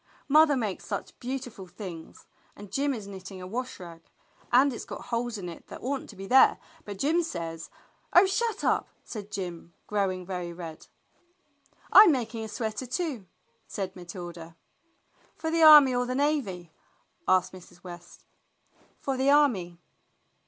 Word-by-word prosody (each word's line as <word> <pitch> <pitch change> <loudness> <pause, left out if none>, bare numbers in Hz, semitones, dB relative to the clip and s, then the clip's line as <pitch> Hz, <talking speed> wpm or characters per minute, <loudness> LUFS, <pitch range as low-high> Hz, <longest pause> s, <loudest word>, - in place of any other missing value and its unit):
"Mother 300 0 +5
makes 215 -6 -3
such - - -6
beautiful 245 -6 -6
things, 175 -3 -10 0.3
and 205 -1 -12
Jim 285 +1 0
is 225 -6 -5
knitting 190 -1 -9
a 180 - -8
wash 250 +7 -5
rag, 170 -2 -10 0.5
and 260 +3 +5
it's 230 - -6
got - - -8
holes 235 -1 -1
in 185 -3 -6
it 170 - -10
that - - -10
ought 270 +2 -2
n't - - -14
to 210 - -11
be 195 0 -8
there, 260 +6 +6 0.3
but 205 -1 -7
Jim 310 - +2
says 165 - -5
— - - -33
" - - -33
"Oh 355 - +8
shut 445 +4 -1
up!" - - +1
said 210 -2 -8
Jim, 175 -3 -6
growing 190 -3 -1
very 180 -2 -4
red. 165 -2 -9 1.1
"I'm 410 -4 +10
making 230 -4 -2
a - - -5
sweater 220 +2 -4
too," 255 - -3 0.4
said 190 -2 -5
Matilda. 175 -2 -9 0.8
"For 320 0 -3
the 330 0 +1
army 300 -4 +9
or 245 0 0
the 255 - -2
navy?" 250 - -1 0.6
asked 185 0 +3
Mrs. 180 -1 -14
West. 175 -1 -12 0.7
"For 270 - -3
the 265 +2 +2
army." 230 -13 +3
210 Hz, 165 wpm, -27 LUFS, 180-270 Hz, 1.1 s, I'm